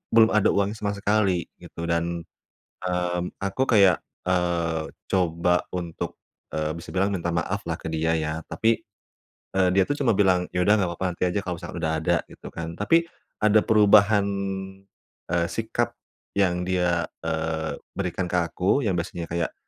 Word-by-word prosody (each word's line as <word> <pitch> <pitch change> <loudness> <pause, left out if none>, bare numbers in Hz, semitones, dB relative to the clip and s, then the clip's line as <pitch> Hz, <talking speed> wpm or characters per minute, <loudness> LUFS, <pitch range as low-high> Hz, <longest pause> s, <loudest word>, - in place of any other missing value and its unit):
belum 110 -1 +7
ada 105 -2 +4
uang 100 0 +1
sama 100 -1 -2
sekali 100 -3 +1 0.2
gitu 85 - -8
dan, 85 0 -1 0.6
mmm, 90 -1 0 0.2
aku 100 +7 0
kayak, 100 -6 +5 0.2
eee, 85 -3 0 0.2
coba 90 -1 +2
untuk, 85 -2 -4 0.3
eee, 80 0 -1
bisa 85 - -9
bilang 95 +2 +2
minta 85 -3 -2
maaf 95 +4 -1
lah 80 -1 -3
ke - - -6
dia 80 +1 0
ya. 80 +1 -3
Tapi, 115 +1 +2 0.8
eee, 95 -1 +4
dia 95 0 +4
tuh 145 - +1
cuma 120 -4 +4
bilang, 95 -3 +4
"Ya 90 - 0
udah 105 - +6
nggak 95 -4 +1
apa-apa, 95 +2 -2
nanti - - 0
aja 100 - -1
kalau 90 - -1
misalkan - - -7
udah 80 0 0
ada," 85 - +3
gitu - - -11
kan. 85 0 -5
Tapi 165 +11 +3 0.3
ada 110 0 +5
perubahan, 105 -1 +5 1.1
eee, 85 -1 +2
sikap - - -2 0.4
yang 90 -2 +2
dia, 90 -2 +1 0.2
eee, 80 -1 -2 0.2
berikan 90 -1 -2
ke 90 - -5 0.2
aku, 100 +10 +1
yang 100 - +1
biasanya 85 0 -3
kayak 85 -1 -1
90 Hz, 165 wpm, -25 LUFS, 85-100 Hz, 1.1 s, belum